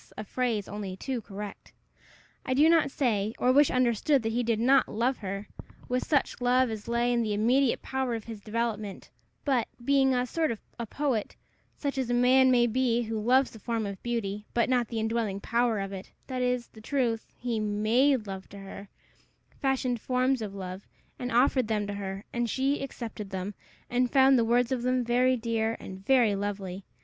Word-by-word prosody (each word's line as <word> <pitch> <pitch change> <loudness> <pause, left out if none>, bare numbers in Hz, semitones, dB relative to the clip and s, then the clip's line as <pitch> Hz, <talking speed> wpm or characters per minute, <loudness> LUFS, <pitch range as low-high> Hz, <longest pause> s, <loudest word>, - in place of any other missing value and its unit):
a - - -4
phrase 225 -2 -1
only 200 -2 -5
too 255 +2 -3
correct. 205 0 -8 0.7
I 255 - -1
do 295 +4 +6
not 330 -4 +4
say, 225 -7 0
or 250 - +3
wish 285 +2 +5
understood, 255 +2 +2
that 225 - -1
he 240 +2 0
did 230 -2 0
not 260 +3 +4
love 245 +4 0
her 200 0 -5 0.4
with 250 0 -1
such 285 -4 +1
love 250 0 +3
as 215 -1 -6
lay 235 +1 +1
in 240 - +2
the 215 -2 -1
immediate 245 +5 +2
power 265 -3 -1
of 225 - -5
his 220 -2 -8
development; 215 -2 -3 0.3
but, 260 -5 +2 0.2
being 270 -1 +4
a 250 0 +1
sort 320 +5 0
of 225 - -3 0.2
a 235 - -3
poet, 265 -4 -1 0.4
such 280 -2 -2
as 255 -2 -1
a 245 - +2
man 260 +2 +5
may 245 -2 +5
be 240 0 +1
who 220 -1 -3
loves 255 +4 +3
the 220 - -12
form 225 0 -2
of 200 -2 -6
beauty, 210 -3 -3
but 235 0 +2
not 245 -2 +2
the 225 0 -3
indwelling 220 -3 -1
power 230 0 +1
of 195 0 -4
it, 190 0 -8 0.2
that 255 -1 -3
is, 250 -1 0
the 220 - -14
truth, 235 -2 -1
he 240 -2 -2
made 215 +5 +2
love 190 -1 -7
to 200 - -11
her 195 0 -9 0.7
fashioned 255 -3 0
forms 255 0 +1
of 205 -2 -5
love, 185 0 -7 0.3
and 250 0 -3
offered 250 0 +3
them 210 -2 0
to 205 - -4
her; 195 0 -5
and 240 -1 -1
she 270 +5 0
accepted 225 -6 -6
them, 190 +1 -4 0.3
and 250 0 +1
found 270 0 +5
the 230 - +2
words 240 +1 +2
of 255 -2 0
them 255 0 +1
very 250 +2 +3
dear 225 -1 -1
and 190 0 -9
very 240 -2 +4
lovely. 195 -2 -4
235 Hz, 200 wpm, -28 LUFS, 210-255 Hz, 0.7 s, do